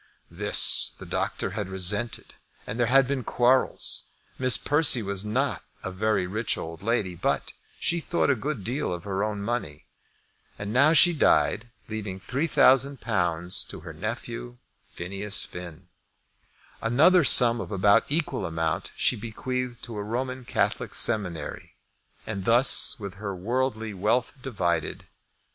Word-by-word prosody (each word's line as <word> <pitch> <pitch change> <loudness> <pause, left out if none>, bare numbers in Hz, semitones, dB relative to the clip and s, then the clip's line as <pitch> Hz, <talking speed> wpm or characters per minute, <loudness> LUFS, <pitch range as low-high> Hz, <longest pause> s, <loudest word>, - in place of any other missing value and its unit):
This - - +5
the - - -10
doctor - - -3
had 100 -3 -4
resented, 100 +5 -1 0.3
and 110 - -6
there 120 - +2
had 135 +2 +5
been 135 -2 -2
quarrels. 125 +3 +1 0.3
Miss 130 -3 +5
Persse 145 -5 +3
was 100 -1 -2
not 125 +6 -2 0.2
a 90 - -4
very 100 0 0
rich 105 +5 -1
old 80 +1 -7
lady, 105 -4 -1
but 85 - -2 0.3
she 170 - 0
thought 165 -3 0
a - - +2
good 130 -2 -4
deal 125 +4 -2
of 85 -1 -5
her 100 0 -2
own 105 -1 -3
money. 100 -10 -4 0.7
And 105 +1 -5
now 140 +5 +5
she 175 +2 +7
died, 120 -6 +2 0.2
leaving 105 -3 -6
£3,000 120 - +1
to - - -7
her - - -9
nephew - - -6 0.3
Phineas 100 +3 -3
Finn. 90 0 -10 0.9
Another 155 +10 +4
sum 120 -3 +5
of - - -7
about 100 +1 +3
equal 150 - -1
amount 80 -1 -2
she - - +3
bequeathed 120 +2 -5
to 115 -3 -6
a 105 - -3
Roman 125 +3 -4
Catholic - - -1
seminary; 100 -8 -2 0.5
and 100 -3 -5
thus 120 +3 +4
was 100 -3 -7
her 100 0 -6
worldly 110 +2 -2
wealth 105 +6 0
divided. 85 - -2
110 Hz, 140 wpm, -26 LUFS, 95-125 Hz, 0.9 s, she